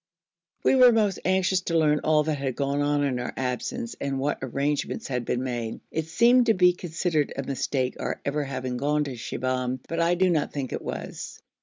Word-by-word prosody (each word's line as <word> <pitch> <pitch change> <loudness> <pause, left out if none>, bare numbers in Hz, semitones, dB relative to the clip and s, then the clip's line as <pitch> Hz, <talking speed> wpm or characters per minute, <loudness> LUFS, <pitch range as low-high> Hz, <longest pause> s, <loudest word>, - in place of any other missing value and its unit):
We - - +4
were 250 -2 +8
most 210 -4 +1
anxious 185 0 +2
to 170 - +1
learn 150 -2 +3
all 155 0 +3
that 150 -2 -2
had 135 -3 -2
gone 140 0 0
on 145 0 +1
in 130 -3 0
our 125 - -5
absence, 130 - -3
and 140 -1 -1
what 140 +2 -1
arrangements 140 +3 -2
had 125 -3 -2
been 125 - -1
made. 120 -3 -3
It 160 0 -2
seemed 240 +7 +4
to 225 - +4
be 180 -1 +5
considered 165 -3 -1
a 135 - -3
mistake 130 -1 -2
our - - -3
ever 145 +1 0
having 130 -2 -4
gone 150 +3 +1
to 140 -3 -5
Shibahm, 130 +2 -2
but 165 - -3
I 170 +1 +3
do 185 0 +3
not 155 -3 0
think 135 -3 -3
it - - -3
was. - - -6
145 Hz, 205 wpm, -26 LUFS, 130-175 Hz, -, were